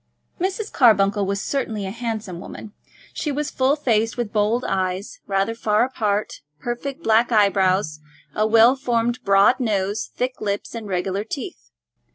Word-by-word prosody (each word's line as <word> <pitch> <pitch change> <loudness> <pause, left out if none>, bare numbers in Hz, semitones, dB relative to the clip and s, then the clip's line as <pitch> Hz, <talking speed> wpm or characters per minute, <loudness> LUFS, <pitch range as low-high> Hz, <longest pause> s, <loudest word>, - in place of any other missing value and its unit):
Mrs. 390 +4 -2
Carbuncle 205 -5 +4
was 200 0 -1
certainly 225 -7 -2
a 190 - -4
handsome 220 -6 -5
woman. 210 +3 -9 0.4
She 300 - -2
was 295 +1 -2
full 265 +2 +2
faced, 230 -6 0
with 235 -4 -3
bold 220 +3 +1
eyes, 190 - -2
rather 195 +3 0
far 215 -1 +1
apart, 210 -5 -2 0.2
perfect 265 - -5
black 225 +1 +3
eyebrows, 190 -6 +2 0.3
a 215 +5 +1
well 230 +3 +6
formed 240 -2 0
broad 200 +6 +4
nose, 205 -3 -1
thick 255 +1 -3
lips, 205 -1 -3
and 225 -2 -6
regular 190 +1 -2
teeth. 280 - -7
220 Hz, 150 wpm, -22 LUFS, 200-245 Hz, 0.4 s, well